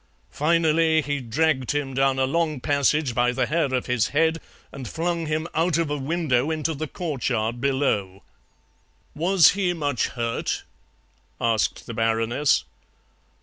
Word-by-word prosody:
Finally, 160 0 +2
he 145 0 -2
dragged 130 +2 0
him 145 -2 -2
down 135 0 +2
a 130 - +2
long 155 0 0
passage 140 0 +1
by 120 +1 +2
the 125 +1 0
hair 155 -3 0
of 130 -1 -1
his 125 -3 +1
head 160 +2 +1 0.3
and 135 -3 -7
flung 170 0 -2
him 155 +2 -1
out 165 0 +1
of 165 -3 -1
a - - 0
window 145 -2 0
into 160 0 -1
the 155 +2 -4
courtyard 125 -8 -2
below." 120 -9 0 0.9
"Was 175 +2 +5
he 185 -2 0
much 145 -7 -1
hurt?" 115 -1 -3 0.8
asked 115 -2 0
the 115 - -7
Baroness. 115 - +1
145 Hz, 145 wpm, -24 LUFS, 125-160 Hz, 0.9 s, Was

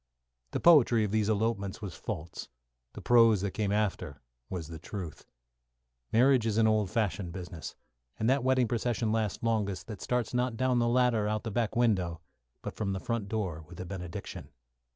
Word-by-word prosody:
The - - -2
poetry 125 -9 +6
of 105 - -1
these 110 -1 +1
elopements 105 -2 -1
was 100 -6 -6
false, 80 +3 -6 0.5
the - - -9
prose 115 -4 +5
that 100 -1 -1
came 105 0 -1
after 95 -9 -1 0.3
was 90 -5 -4
the 80 0 -8
truth. 90 -2 -7 0.8
Marriage 125 0 +4
is 110 -1 0
an 115 - +5
old 110 -3 +2
fashioned 95 -4 -1
business, 90 -3 -7 0.4
and 110 - 0
that 135 +1 +3
wedding 130 -2 +3
procession 115 -1 -1
lasts 110 -2 -1
longest 105 -4 0
that 105 -4 -8
starts 125 -2 -1
not 125 -1 0
down 130 0 +2
the 120 - +2
ladder 120 -3 +2
out 110 0 -1
of - - -34
the 110 - -4
back 115 0 -1
window, 95 -9 +1 0.4
but - - -5
from 100 -3 -2
the 95 - -3
front 115 -1 -3
door 95 -8 -3
with 90 +1 -12
a 90 - -5
benediction. 90 -2 -7
110 Hz, 185 wpm, -30 LUFS, 95-115 Hz, 0.8 s, poetry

